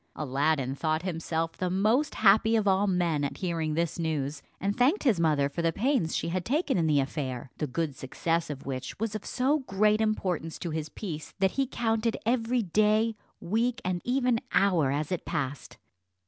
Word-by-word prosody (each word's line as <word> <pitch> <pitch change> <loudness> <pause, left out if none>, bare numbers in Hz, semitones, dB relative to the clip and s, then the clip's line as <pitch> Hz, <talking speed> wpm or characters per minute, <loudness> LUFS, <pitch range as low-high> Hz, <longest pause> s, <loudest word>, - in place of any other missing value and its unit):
Aladdin 140 -1 0
thought 155 +3 -1
himself 165 -2 -2
the 185 - -2
most 215 +10 +2
happy 220 +2 +5
of 215 -2 +1
all 195 +1 +3
men 175 -5 +1
at 140 - -3
hearing 165 -4 -2
this 170 +1 -1
news, 150 -3 -2 0.2
and 200 +1 -1
thanked 270 +11 +3
his 235 - +3
mother 150 -4 +3
for 145 +4 -4
the 165 0 +2
pains 230 - 0
she - - -1
had 180 +1 -1
taken 290 - 0
in 165 -3 +2
the 150 -2 +3
affair, 135 -2 -3
the 150 - -1
good 145 +1 -2
success 165 +6 -2
of 145 -3 -6
which 130 +4 -5
was 225 -1 -2
of 215 - -4
so 275 +4 +1
great 215 -3 +2
importance 185 -7 -1
to 170 - -4
his 155 0 -3
peace, 160 -6 -7
that 190 0 +2
he 270 -1 0
counted 225 -2 0
every 240 0 +1
day, 215 +4 +2 0.2
week, 230 +6 0
and 180 -1 -1
even 250 -2 +1
hour 175 -8 +3
as 150 +4 -2
it 180 - -2
passed. 140 -1 -4
180 Hz, 190 wpm, -28 LUFS, 155-220 Hz, 0.2 s, happy